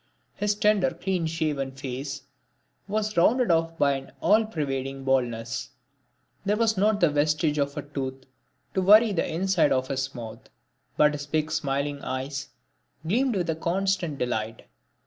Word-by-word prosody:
His 205 0 0
tender 210 -3 +3
clean 175 0 -2
shaven 150 -4 -2
face 135 +1 -5 0.6
was 215 +1 -1
rounded 230 +5 +4
off 165 0 +1
by 140 -3 +3
an 135 -1 -4
all 220 +1 +4
pervading 135 -7 -3
baldness; 120 -4 -1 0.7
there 205 +2 +1
was 225 -1 +2
not 205 +2 +2
the 170 -5 +4
vestige 150 +1 +1
of 140 0 -1
a 145 - -3
tooth 135 -2 -5 0.5
to 190 - +1
worry 210 +4 +7
the 185 - -1
inside 175 -2 +2
of 130 0 +1
his 135 0 -2
mouth; 115 -2 -9 0.5
and 150 0 +5
his 145 -1 -5
big 155 +1 -1
smiling 140 -1 -1
eyes 135 +2 -4 0.6
gleamed 245 +6 +2
with 180 -3 -1
a - - -2
constant 175 -1 -1
delight. 115 -3 -3
150 Hz, 150 wpm, -26 LUFS, 135-190 Hz, 0.7 s, worry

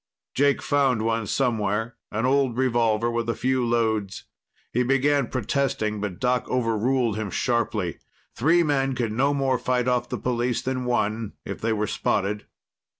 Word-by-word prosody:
Jake 140 0 +2
found 135 -6 +2
one 115 -1 0
somewhere, 115 -2 0 0.2
an 110 +3 -1
old 130 -2 +2
revolver 120 -3 +2
with 115 0 -2
a 115 - 0
few 130 0 0
loads. 110 -4 0 0.5
He 125 - +2
began 135 +1 +2
protesting, 115 -4 -1
but 100 -4 -4
Doc 125 0 0
overruled 120 -1 +1
him 110 -2 -3
sharply. 110 - -1 0.4
Three 165 +6 +4
men 135 -3 +1
could 120 -3 -1
no 135 +6 +2
more 135 -3 +1
fight 125 0 0
off 125 -1 +1
the - - -2
police 120 -1 -1
than 130 -1 -2
one, 110 -2 -1
if - - -6
they 115 - 0
were 105 -1 0
spotted. 105 0 -1
120 Hz, 155 wpm, -25 LUFS, 110-130 Hz, 0.5 s, Three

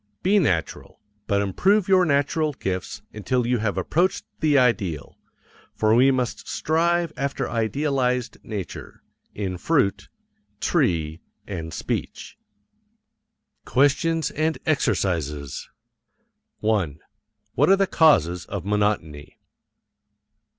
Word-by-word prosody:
Be 205 +3 +4
natural 85 - -2 0.3
but 100 -1 +2
improve 190 - +2
your 185 -2 +5
natural 150 +1 +1
gifts 95 -2 -4
until 115 +4 -1
you 120 0 +1
have 105 -2 -1
approached 170 - 0
the 150 -2 +3
ideal, 100 - 0 0.6
for 110 0 +2
we 125 +4 +5
must 130 -3 -1
strive 170 +1 0
after 140 0 -2
idealized 125 +1 -1
nature, 100 -5 -7 0.3
in 95 -3 -3
fruit, 135 - +1 0.5
tree, 80 -1 0 0.2
and 80 -5 -6
speech. - - -4 1.3
QUESTIONS 150 +3 +2
AND 160 +1 -1
EXERCISES. 75 - -1 0.9
1. 95 -10 0 0.5
What 145 - +3
are 195 - +7
the 195 0 +2
causes 90 - +3
of 100 -2 -6
monotony? 100 -8 -1
115 Hz, 100 wpm, -24 LUFS, 95-155 Hz, 1.3 s, are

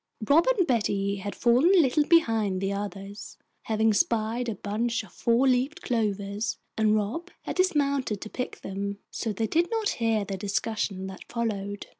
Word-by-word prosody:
Rob 320 +8 +5
and 370 - +3
Betty 200 -5 0
had 200 +1 -5
fallen 255 +11 +4
a - - +7
little 295 0 +3
behind 225 - +3
the 195 +1 -1
others, 200 0 -6 0.3
having 220 0 +2
spied 230 +3 +1
a 220 - -3
bunch 225 +4 -2
of 200 - -15
four 235 +8 +2
leafed 265 +8 +1
clovers, 210 -2 -1 0.2
and 215 -1 +3
Rob 230 - -2
had - - -5
dismounted 280 - +1
to - - -6
pick 250 +3 -5
them, 200 +1 -4
so 225 - -2
they 220 +2 -1
did 335 +9 +1
not 445 -2 0
hear 225 -3 +2
the 195 -1 -4
discussion 200 0 -2
that 190 0 -9
followed. 205 -4 -3
220 Hz, 170 wpm, -27 LUFS, 200-255 Hz, 0.3 s, a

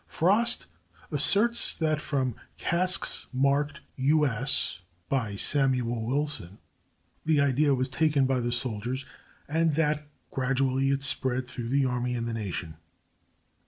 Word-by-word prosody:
Frost 205 +8 +2 0.5
asserts 235 +4 +5
that 155 -2 -1
from 130 -5 -1 0.2
casks 185 +2 0
marked 140 +2 0 0.2
"U. 150 +3 +3
S." 135 -6 -1 0.3
by 115 -7 -1
Samuel 125 -2 +1
Wilson, 135 - -2 0.7
the 155 -2 +2
idea 140 +1 +2
was 130 0 -1
taken 145 0 +1
by 130 -1 0
the 120 0 -2
soldiers, 120 +2 -2 0.4
and 160 +1 +1
that 150 -1 0 0.2
gradually 135 0 0
it 135 0 0
spread 130 -3 0
through 120 -2 -6
the 135 +1 +2
army 125 -1 -2
and 115 -1 -3
the 115 - -3
nation. 90 -7 -5
135 Hz, 125 wpm, -27 LUFS, 125-150 Hz, 0.7 s, asserts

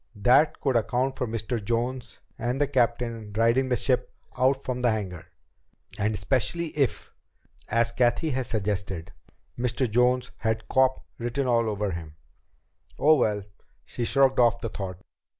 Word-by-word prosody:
That 125 +9 +4
could 135 -3 +1
account 125 +4 +1
for 125 - -2
Mr. 115 0 -3
Jones 120 +4 -3
and 120 +3 -2
the 145 - +3
captain 120 -4 -1
riding 115 +4 +2
the 125 - +2
ship 125 0 0 0.2
out 135 +1 +2
from 125 -1 -3
the 125 - +3
hangar. 95 -7 -3 0.7
And 105 +1 +1
especially 130 - 0
if, 140 -4 -1 0.6
as 115 +1 +2
Cathy 120 +6 +1
had 130 -2 -1
suggested, 100 -5 -2 0.5
Mr. 125 +1 0
Jones 125 +3 +2
had 110 0 -2
"cop" 130 0 +2
written 120 +4 -2
all 115 -2 +2
over 105 -1 -2
him. 80 -3 -7 0.8
Oh, 155 +2 +5
well! 105 -8 +1 0.4
She 120 - -5
shrugged 135 +2 +3
off 120 -1 +4
the 115 - -4
thought. 95 -3 -6
120 Hz, 150 wpm, -26 LUFS, 110-130 Hz, 0.8 s, Oh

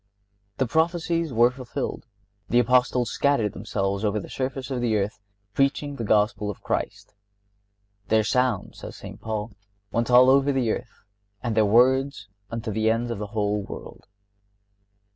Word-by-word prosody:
The 130 - +1
prophecies 165 +3 0
were 120 +1 +4
fulfilled. 125 -2 -5 0.4
The 120 - +2
Apostles 125 0 +3
scattered 130 -8 +1
themselves 100 0 -2
over 105 0 +1
the - - -9
surface 135 0 -4
of 125 -2 -2
the 115 -3 +1
earth, 100 +1 -2 0.3
preaching 140 +2 0
the 115 - -3
Gospel 105 0 +1
of 105 - -7
Christ. - - -3 0.9
"Their 110 0 +3
sound," 125 -1 0
says - - -9
St. - - -10
Paul, 110 0 -3 0.4
"went 115 +3 0
over 125 - +7
all 135 +1 +6
the 135 -5 +1
earth - - -7 0.4
and 115 -3 -1
their 110 -1 +4
words 125 0 +3 0.2
unto 115 -1 -4
the 110 +1 +1
ends 115 +1 0
of 115 - -4
the 105 - -4
whole 105 0 +1
world." 100 - -10
120 Hz, 155 wpm, -25 LUFS, 105-130 Hz, 0.9 s, over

